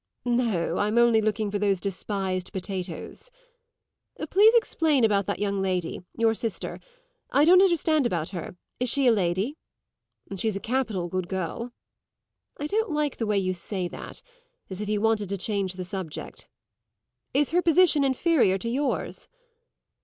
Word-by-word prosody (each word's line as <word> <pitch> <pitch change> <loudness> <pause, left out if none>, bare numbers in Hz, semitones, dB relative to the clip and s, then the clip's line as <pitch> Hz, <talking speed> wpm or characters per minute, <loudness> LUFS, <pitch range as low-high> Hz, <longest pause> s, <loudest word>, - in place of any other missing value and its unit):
"No, 230 -9 0
I'm 210 +3 +1
only 235 -2 +5
looking 215 -1 -1
for 205 - -1
those 200 -2 +1
despised 190 -1 -3
potatoes." 190 - -5 1.0
"Please 415 +4 +7
explain 320 - +2
about 200 -3 +2
that - - -1
young 200 -1 -1
lady 185 -3 -2 0.2
your 225 -1 +3
sister 225 -1 -4
then. - - -29 0.5
I - - +6
don't 365 +3 +7
understand 320 -7 +3
about 165 -7 -2
her. 180 -2 -6 0.2
Is 250 0 0
she 275 +2 +2
a 245 - +6
Lady?" 200 - 0 0.8
"She's 215 +2 -1
a - - -2
capital 220 -7 -1
good 185 0 -3
girl." 190 +6 -4 0.9
"I 290 - -3
don't 435 +7 0
like 300 -2 -1
the 225 - -2
way 210 -1 +1
you 185 -1 0
say 180 +1 -4
that - - -9 0.5
as 190 +2 -5
if 210 - -4
you 210 -1 0
wanted 220 -3 +1
to 200 - -2
change 195 -1 -1
the 185 0 -6
subject. 185 -4 -7 0.9
Is 290 +1 +2
her 350 +2 +3
position 335 -3 +4
inferior 265 - +3
to 230 +5 -4
yours?" 275 +4 -2
215 Hz, 160 wpm, -26 LUFS, 190-270 Hz, 1.0 s, Please